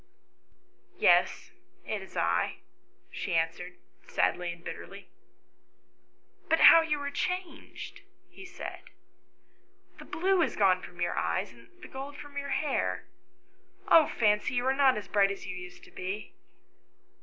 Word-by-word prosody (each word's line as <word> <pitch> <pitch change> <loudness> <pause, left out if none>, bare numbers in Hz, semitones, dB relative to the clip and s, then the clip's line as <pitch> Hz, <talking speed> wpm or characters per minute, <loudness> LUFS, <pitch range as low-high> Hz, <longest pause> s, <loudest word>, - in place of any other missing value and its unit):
" - - -38
Yes, - - +3 0.3
it 215 -2 -3
is 190 - -11
I," 85 +1 +1 0.6
she - - -3
answered, 165 +2 -1 0.3
sadly 180 -1 0
and 170 0 -12
bitterly. - - -9 0.7
" - - -39
But 325 - +3
how 330 - +10
you 305 -2 -1
are 285 0 -3
changed!" 360 +2 -5 0.3
he - - -13
said. 380 - -8 0.6
" - - -38
The - - -10
blue 375 +2 +1
is - - 0
gone 185 -3 +3
from 175 0 -11
your 175 - 0
eyes, 85 +7 -1
and 115 -1 -19
the - - -8
gold 275 +2 -8
from 290 -1 -11
your 280 0 -4
hair. 285 0 -1 0.9
Oh, 325 -2 +7
Fancy, 210 +1 +1
you 245 0 0
are 265 - +3
not 270 -1 +4
so 185 - -20
bright 200 -1 +4
as 200 - -6
you 185 - -5
used 180 0 -10
to - - -16
be." 190 +3 -6
210 Hz, 155 wpm, -29 LUFS, 180-285 Hz, 0.9 s, how